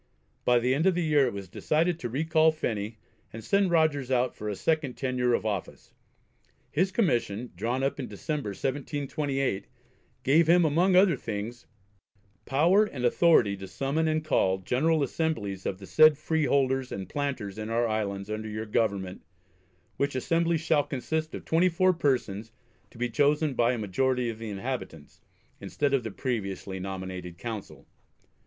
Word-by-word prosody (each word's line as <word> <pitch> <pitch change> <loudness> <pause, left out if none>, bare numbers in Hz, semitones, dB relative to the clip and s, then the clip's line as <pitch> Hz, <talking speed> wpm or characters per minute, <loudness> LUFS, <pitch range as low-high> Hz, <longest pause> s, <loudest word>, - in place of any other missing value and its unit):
By 125 0 +5
the 125 +2 +2
end 155 +7 +2
of 190 - +3
the 175 - 0
year 150 -4 +3
it 120 - -3
was 100 -1 -6
decided 160 - 0
to 120 - -4
recall 160 +5 +3
Phenney 110 -8 -3 0.3
and 115 0 -8
send 200 -1 +2
Rogers 155 -6 +2
out 125 -1 +1
for 105 - -5
a 105 - -3
second 155 0 0
tenure 125 -2 +1
of - - -3
office. 105 -3 -4 0.8
His 185 +5 +1
commission, 120 - 0
drawn 125 +3 -1
up 135 +1 -1
in 130 - -4
December, 135 +5 -4
1728, 135 -1 -2 0.6
gave 155 +5 +4
him 175 0 +6
among 175 +5 +3
other 185 -3 +6
things, 115 0 -6 0.8
"power 170 +10 +4
and 130 -11 -4
authority 120 -6 +4
to 95 0 -8
summon 140 +10 -1
and 155 0 0
call 95 -10 +2
General 145 - +1
Assemblies 115 - -2
of 95 - -2
the 95 - -11
said 155 +6 +6
Freeholders 140 -4 +1
and 95 -1 -5
Planters 125 -7 -3
in 110 +1 -4
our 115 +1 +1
Islands 100 -3 -2
under 110 0 -4
your 110 +1 -4
Government, 100 -4 -1 0.8
which 140 -1 -1
Assembly 165 +5 +1
shall 160 -1 +2
consist 155 +5 -3
of - - -8
twenty 170 +3 +3
four 185 +2 +3
persons 115 - -1 0.4
to - - -17
be 125 +1 0
chosen 145 +4 +2
by 120 0 +2
a - - -2
majority 125 +4 0
of 110 - -10
the 115 -1 -6
inhabitants," 100 - -6 0.4
instead 145 -1 -1
of 135 - +3
the 110 - -5
previously 100 -4 -4
nominated 95 -2 -6
Council. 110 -2 -7
130 Hz, 165 wpm, -28 LUFS, 110-155 Hz, 0.8 s, him